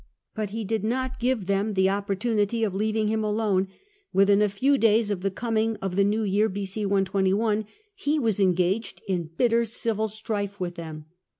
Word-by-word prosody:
But 215 Hz, -3 st, -3 dB
he 220 Hz, +2 st, -4 dB
did 220 Hz, 0 st, -1 dB
not 260 Hz, +3 st, -2 dB
give 245 Hz, -4 st, 0 dB
them 200 Hz, +2 st, 0 dB
the 190 Hz, 0 st, +4 dB
opportunity 205 Hz, +2 st, 0 dB
of 205 Hz, -4 st, 0 dB
leaving 215 Hz, +2 st, 0 dB
him 220 Hz, 0 st, 0 dB
alone; 210 Hz, -3 st, +1 dB, 0.4 s
within 200 Hz, +1 st, +4 dB
a 210 Hz, -, +3 dB
few 265 Hz, +8 st, +2 dB
days 220 Hz, -1 st, +3 dB
of 190 Hz, -3 st, -2 dB
the 195 Hz, -, 0 dB
coming 225 Hz, +2 st, -1 dB
of 195 Hz, -3 st, -4 dB
the 200 Hz, -, +4 dB
new 210 Hz, +2 st, +1 dB
year, 210 Hz, +2 st, +2 dB
B.o. 200 Hz, +2 st, -4 dB, 0.2 s
121, 200 Hz, +2 st, +1 dB, 0.3 s
he 315 Hz, -7 st, -1 dB
was 225 Hz, -8 st, +1 dB
engaged 185 Hz, +4 st, +1 dB
in 175 Hz, -4 st, -1 dB
bitter 235 Hz, -1 st, +3 dB
civil 220 Hz, -1 st, -1 dB
strife 205 Hz, -2 st, -4 dB
with 180 Hz, -1 st, -3 dB
them. 160 Hz, -3 st, -8 dB
210 Hz, 180 wpm, -26 LUFS, 195-225 Hz, 0.4 s, the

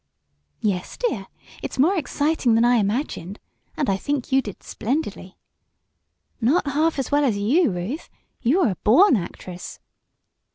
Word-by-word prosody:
"Yes, 190 Hz, -4 st, -2 dB
dear! 485 Hz, -, -2 dB, 0.3 s
It's -, -, -5 dB
more 320 Hz, +9 st, +4 dB
exciting 290 Hz, -6 st, +1 dB
than 230 Hz, +1 st, +4 dB
I 245 Hz, 0 st, +4 dB
imagined. 205 Hz, -, -2 dB, 0.4 s
And 290 Hz, -, 0 dB
I 195 Hz, -, +2 dB
think 280 Hz, +4 st, -3 dB
you 270 Hz, +1 st, +4 dB
did 205 Hz, -6 st, -9 dB
splendidly!" 220 Hz, -6 st, -3 dB, 1.0 s
"Not 275 Hz, +11 st, +3 dB
half 305 Hz, +3 st, +1 dB
as 270 Hz, 0 st, -2 dB
well 290 Hz, +1 st, +3 dB
as 235 Hz, -7 st, +1 dB
you, 260 Hz, -, +3 dB
Ruth. 195 Hz, -, -4 dB, 0.3 s
You 295 Hz, +11 st, +3 dB
are 250 Hz, -, +3 dB
a 185 Hz, -, -6 dB
born 265 Hz, -, +5 dB
actress!" 180 Hz, -1 st, -6 dB
250 Hz, 150 wpm, -23 LUFS, 205-295 Hz, 1.0 s, born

